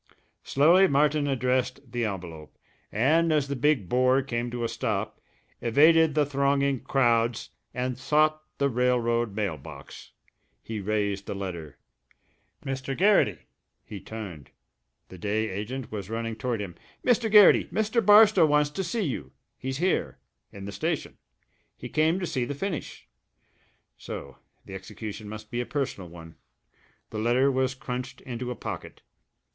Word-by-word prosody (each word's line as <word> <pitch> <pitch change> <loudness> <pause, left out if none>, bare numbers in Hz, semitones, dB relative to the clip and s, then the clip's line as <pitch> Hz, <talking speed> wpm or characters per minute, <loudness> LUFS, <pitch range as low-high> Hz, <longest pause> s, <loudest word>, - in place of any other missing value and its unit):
Slowly 170 +7 +5
Martin 145 0 +2
addressed 130 -1 -1
the 120 -1 -1
envelope, 85 -6 -7 0.3
and 160 +9 +3
as 150 -3 +2
the 140 - -2
big 130 -6 +1
bore 130 +4 +3
came 120 -2 -3
to 120 0 -4
a - - +1
stop, - - -3 0.4
evaded 155 +6 +5
the 150 -1 +3
thronging 140 -1 +1
crowds 120 -3 +1 0.2
and 125 0 -3
sought 155 +2 +2 0.2
the 140 - +2
railroad 120 -3 +1
mail 100 -7 -1
box. 70 -1 -12 0.5
He 110 -1 -5
raised 100 -1 -1
the - - -4
letter.... 85 -6 -6 0.9
"Mr. 135 0 -3
Garrity!" 185 - +3 0.4
He 100 - -8
turned. 95 - -8 0.6
The 95 - -11
day 110 +3 -1
agent 115 +7 -5
was 100 -2 -5
running 115 0 -3
toward 115 0 -2
him. 95 -4 -6 0.3
"Mr. 240 -2 +3
Garrity, 210 -2 +7
Mr. 220 +3 0
Barstow 205 -4 +7
wants 150 0 +2
to 190 +6 -3
see 225 +3 -2
you. 70 - -4 0.2
He's 130 +1 -4
here 180 +4 0 0.3
in 100 -1 -9
the 100 - -5
station. 100 - -3 0.6
He - - -8
came 160 +4 +2
to 185 - -2
see 130 -7 -1
the 140 +4 -4
finish." 180 +1 -5 0.9
So 70 -2 -8 0.3
the 95 - -10
execution 105 +2 -7
must 110 0 -9
be 120 0 -1
a - - -4
personal 120 - -3
one! 80 -1 -12 0.7
The 110 - -4
letter 125 +5 +3
was 130 0 0
crunched 125 -1 -6
into 125 -1 -5
a 125 - -3
pocket. - - -7
125 Hz, 150 wpm, -27 LUFS, 105-145 Hz, 0.9 s, Garrity